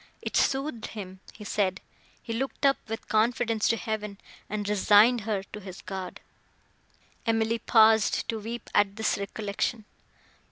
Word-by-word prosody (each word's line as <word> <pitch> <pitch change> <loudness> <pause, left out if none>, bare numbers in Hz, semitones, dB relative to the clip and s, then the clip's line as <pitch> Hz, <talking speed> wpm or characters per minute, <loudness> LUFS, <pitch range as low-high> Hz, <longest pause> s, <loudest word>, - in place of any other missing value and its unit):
It - - -5
soothed 270 -4 0
him, 190 -3 -8
he 210 - -12
said; 200 -2 0 0.4
he 230 - -4
looked 270 +4 -2
up 275 0 +5
with 225 0 -6
confidence 225 0 +1
to 230 - +2
heaven, 210 -3 -4 0.3
and 210 -1 -3
resigned 210 +3 +5
her 205 -2 -2
to 210 - -5
his 190 -2 -10
God." 190 -2 -6 1.1
Emily 225 0 +1
paused 220 -2 +4
to 225 - -1
weep 230 +2 -6
at 200 -1 +3
this 220 -2 0
recollection. 205 +2 -3
220 Hz, 145 wpm, -27 LUFS, 205-230 Hz, 1.1 s, up